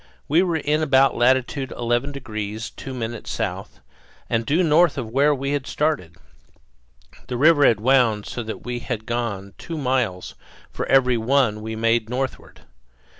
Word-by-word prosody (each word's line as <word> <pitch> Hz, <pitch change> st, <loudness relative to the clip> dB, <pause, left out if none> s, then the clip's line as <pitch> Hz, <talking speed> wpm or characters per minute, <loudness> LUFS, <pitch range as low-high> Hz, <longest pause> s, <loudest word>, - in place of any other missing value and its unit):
We 160 Hz, +5 st, +4 dB
were 175 Hz, -3 st, 0 dB
in 150 Hz, +1 st, 0 dB
about 135 Hz, -3 st, +4 dB
latitude 130 Hz, +2 st, +1 dB
11 120 Hz, +3 st, -1 dB
degrees 110 Hz, -5 st, -5 dB
2 135 Hz, -, -9 dB
minutes 120 Hz, -2 st, -5 dB
south, -, -, -4 dB, 0.5 s
and 115 Hz, 0 st, 0 dB
due 160 Hz, +6 st, +2 dB
north 165 Hz, 0 st, +4 dB
of 115 Hz, -5 st, -4 dB
where 145 Hz, +4 st, +3 dB
we 140 Hz, +1 st, -3 dB
had 145 Hz, -2 st, -2 dB
started. 150 Hz, -, -1 dB, 1.1 s
The 125 Hz, -, -3 dB
river 145 Hz, +1 st, +5 dB
had 110 Hz, -, +3 dB
wound 115 Hz, -3 st, +3 dB
so 120 Hz, -, -5 dB
that 110 Hz, -1 st, -7 dB
we 120 Hz, 0 st, -3 dB
had 115 Hz, -2 st, -5 dB
gone 110 Hz, -5 st, -3 dB
two 165 Hz, -, -6 dB
miles 125 Hz, -10 st, -1 dB, 0.4 s
for -, -, -4 dB
every 130 Hz, -2 st, +4 dB
one 115 Hz, -3 st, +1 dB
we 110 Hz, +1 st, -5 dB
made 115 Hz, 0 st, +1 dB
northward. 130 Hz, +1 st, -4 dB
125 Hz, 160 wpm, -22 LUFS, 115-140 Hz, 1.1 s, river